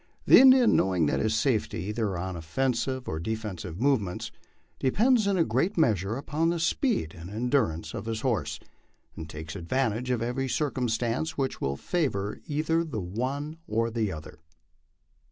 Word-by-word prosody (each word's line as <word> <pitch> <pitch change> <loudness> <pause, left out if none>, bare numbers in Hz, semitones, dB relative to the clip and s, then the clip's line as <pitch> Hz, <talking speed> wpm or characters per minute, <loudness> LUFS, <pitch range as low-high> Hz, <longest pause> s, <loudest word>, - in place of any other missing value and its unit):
The - - +9
Indian, 260 -2 +7
knowing 90 -4 +2
that 75 - +1
his 110 0 +1
safety 110 -7 0
either 105 -2 -2
on 95 +1 -4
offensive 125 +9 -1
or 80 - -3
defensive 95 -3 -5
movements 120 -9 0 0.5
depends 215 - +3
in 200 -1 +2
a 170 - +4
great 195 +3 0
measure 110 - +2
upon 155 +4 0
the 170 0 -1
speed 175 - 0
and 85 +2 -9
endur 120 - +1
ance 80 +1 -7
of 110 -2 -5
his 110 -1 -3
horse, 125 -5 -1 0.7
takes 80 +2 -8
advantage 115 +6 -1
of 120 -2 0
every 130 +3 -1
circumstance 125 0 -1
which 135 -2 -2
will 70 0 -1
favor 105 - -1
either 160 +2 +1
the 150 -10 -4
one 130 - -3
or 115 +1 0
the 110 -3 -1
other. 75 -2 -9
115 Hz, 155 wpm, -27 LUFS, 95-145 Hz, 0.7 s, The